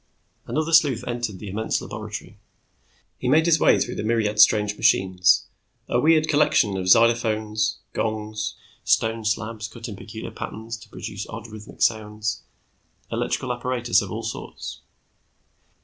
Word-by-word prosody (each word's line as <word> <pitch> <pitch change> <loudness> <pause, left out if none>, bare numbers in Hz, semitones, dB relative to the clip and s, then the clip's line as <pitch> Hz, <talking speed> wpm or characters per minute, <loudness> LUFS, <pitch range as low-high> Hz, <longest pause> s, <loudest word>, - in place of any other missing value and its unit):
Another 155 +2 -1
sleuth 145 -7 +4
entered 120 -5 -3
the 105 - -9
immense 110 +3 -1
laboratory. - - -7 0.8
He 125 - -1
made 155 +4 +5
his 165 -2 +4
way - - +5
through 120 - -1
the - - -4
myriad 110 -2 0
strange 105 -1 +5
machines, 95 -5 +3 0.4
a 120 - +1
weird 155 +2 +4
collection 145 -9 +3
of 95 -1 -3
xylophones, 110 0 +3 0.2
gongs, 110 0 -3 0.3
stone 115 -1 +1
slabs 110 0 -2
cut 115 +1 -9
in 105 - -6
peculiar 110 +3 -8
patterns 110 +2 -6
to 110 - -16
produce 105 -2 -6
odd 115 -1 -7
rhythmic 110 0 -6
sounds, 110 -1 0 0.7
electrical 125 -1 -1
apparatus 120 -1 +1
of 100 -2 -6
all 115 +2 -4
sorts. 115 - -6
110 Hz, 140 wpm, -24 LUFS, 105-120 Hz, 0.8 s, made